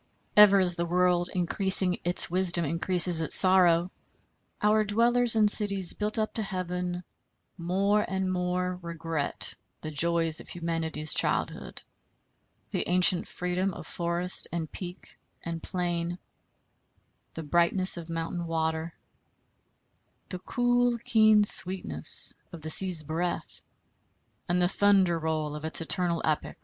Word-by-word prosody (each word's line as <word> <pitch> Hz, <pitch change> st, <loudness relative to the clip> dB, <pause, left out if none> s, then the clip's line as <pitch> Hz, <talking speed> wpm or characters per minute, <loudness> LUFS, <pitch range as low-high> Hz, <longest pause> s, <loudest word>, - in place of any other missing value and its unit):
Ever 205 Hz, -1 st, +7 dB
as 180 Hz, -2 st, +2 dB
the 170 Hz, -, -2 dB
world 180 Hz, 0 st, 0 dB
increasing 185 Hz, 0 st, +1 dB
its 175 Hz, +1 st, +2 dB
wisdom 175 Hz, -1 st, 0 dB
increases 170 Hz, +2 st, 0 dB
its 160 Hz, -, 0 dB
sorrow, 180 Hz, -2 st, +5 dB, 0.7 s
our 215 Hz, 0 st, +2 dB
dwellers 235 Hz, +3 st, +2 dB
in 215 Hz, -1 st, +3 dB
cities 200 Hz, -4 st, +6 dB
built 210 Hz, +1 st, -3 dB
up 215 Hz, -1 st, -2 dB
to 225 Hz, -, -3 dB
heaven 180 Hz, -2 st, -5 dB, 0.5 s
more 195 Hz, +4 st, 0 dB
and 190 Hz, -1 st, -3 dB
more 180 Hz, 0 st, -3 dB
regret 165 Hz, -3 st, -3 dB, 0.3 s
the 155 Hz, -, -7 dB
joys 165 Hz, +1 st, 0 dB
of -, -, -12 dB
humanity's 165 Hz, -3 st, -3 dB
childhood, -, -, -2 dB, 0.9 s
the -, -, -3 dB
ancient 180 Hz, 0 st, +3 dB
freedom 180 Hz, +1 st, -3 dB
of -, -, -10 dB
forest 175 Hz, +1 st, -3 dB
and 165 Hz, -2 st, -5 dB
peak 180 Hz, 0 st, -9 dB, 0.2 s
and 165 Hz, -1 st, -6 dB
plain, 175 Hz, -1 st, -4 dB, 1.2 s
the 165 Hz, -, -6 dB
brightness 175 Hz, +4 st, +2 dB
of 170 Hz, -1 st, -9 dB
mountain 165 Hz, +1 st, -5 dB
water, 160 Hz, 0 st, -3 dB, 1.3 s
the 185 Hz, -, -6 dB
cool 245 Hz, +3 st, 0 dB
keen 220 Hz, -3 st, +3 dB
sweetness 180 Hz, -, +1 dB, 0.2 s
of 165 Hz, -3 st, -11 dB
the 155 Hz, -, -4 dB
sea's 180 Hz, -3 st, +5 dB
breath 165 Hz, +4 st, -5 dB, 0.9 s
and 175 Hz, +1 st, 0 dB
the 175 Hz, -, +2 dB
thunder 190 Hz, -3 st, +2 dB
roll 155 Hz, -2 st, -3 dB
of 150 Hz, -, -9 dB
its 160 Hz, -, -1 dB
eternal 170 Hz, 0 st, -2 dB
epic. 155 Hz, -1 st, -3 dB
180 Hz, 130 wpm, -26 LUFS, 165-190 Hz, 1.3 s, Ever